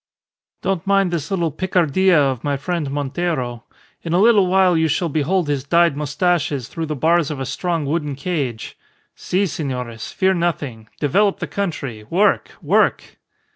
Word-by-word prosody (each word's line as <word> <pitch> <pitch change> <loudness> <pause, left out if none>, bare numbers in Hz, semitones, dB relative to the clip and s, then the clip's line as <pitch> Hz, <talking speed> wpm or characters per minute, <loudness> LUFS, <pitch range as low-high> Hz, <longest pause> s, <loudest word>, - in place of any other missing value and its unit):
Don't 195 -1 -1
mind 195 -2 +3
this 165 -3 -3
little 170 -5 0
picardia 185 0 +2
of 135 -4 0
my 145 -1 0
friend 165 0 -3
Montero. 140 -4 -3 0.4
In 165 - -3
a 175 - +3
little 210 -3 +5
while 185 -1 +4
you 160 0 +2
shall 165 +3 0
behold 155 +4 0
his 145 -3 -1
dyed 170 +1 +3
moustaches 145 -2 0
through 165 -1 -5
the 150 - -3
bars 165 +2 +2
of 150 -3 -4
a 135 - -3
strong 165 +3 -2
wooden 150 -1 -2
cage. 140 -6 -3 0.4
Si, 190 +3 0
senores! 125 - -4
Fear 190 0 +2
nothing, 145 - -3
develop 195 +8 +2
the - - -4
country, 140 - -4
work, 190 - +2
work!" - - +1
160 Hz, 160 wpm, -20 LUFS, 140-180 Hz, 0.4 s, little